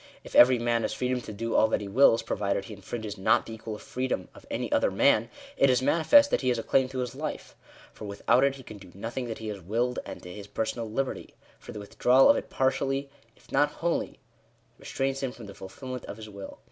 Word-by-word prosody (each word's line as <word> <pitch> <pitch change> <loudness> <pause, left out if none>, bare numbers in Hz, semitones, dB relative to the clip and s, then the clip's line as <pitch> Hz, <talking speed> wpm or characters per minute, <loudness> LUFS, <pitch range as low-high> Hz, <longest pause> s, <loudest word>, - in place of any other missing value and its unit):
If - - -12
every 125 +1 +7
man 120 0 +1
has - - -2
freedom 125 0 -1
to 110 - -8
do 115 +2 -4
all 110 - +5
that - - 0
he 105 - -6
wills, 115 +2 +4
provided 100 -1 -1
he 105 - -9
infringes 105 0 -6
not 95 - +3
the 115 - -8
equal 110 -1 -6
freedom 130 +4 -3
of - - -16
any - - -3
other - - +3
man, - - +3 0.3
it 140 - +5
is 125 0 +2
manifest 225 - +5
that - - +1
he 130 - +1
has 120 - +1
a 115 - -3
claim 130 -1 +2
to 130 - -7
his 125 -2 -2
life: - - -6 0.4
for 110 - -9
without 100 +5 +2
it 140 0 +2
he 135 - -12
can 110 -3 -11
do 95 -2 -14
nothing 120 +5 -4
that 115 - -5
he 110 -1 -6
has 100 -2 -6
willed; 120 +7 -1
and - - -9
to 90 - -9
his 105 0 -9
personal 110 +1 -3
liberty: 135 +5 -3 0.2
for - - -10
the 110 - -8
withdrawal 125 +5 +4
of - - +2
it - - -4
partially, 135 +1 0 0.3
if - - -22
not 145 0 +2
wholly, 170 0 -2 0.6
restrains 135 0 -2
him 135 -2 -2
from 120 -3 -11
the 100 - -10
fulfilment 125 +7 -8
of - - -8
his 110 -1 -9
will. 100 -1 -9
120 Hz, 235 wpm, -28 LUFS, 105-130 Hz, 0.6 s, every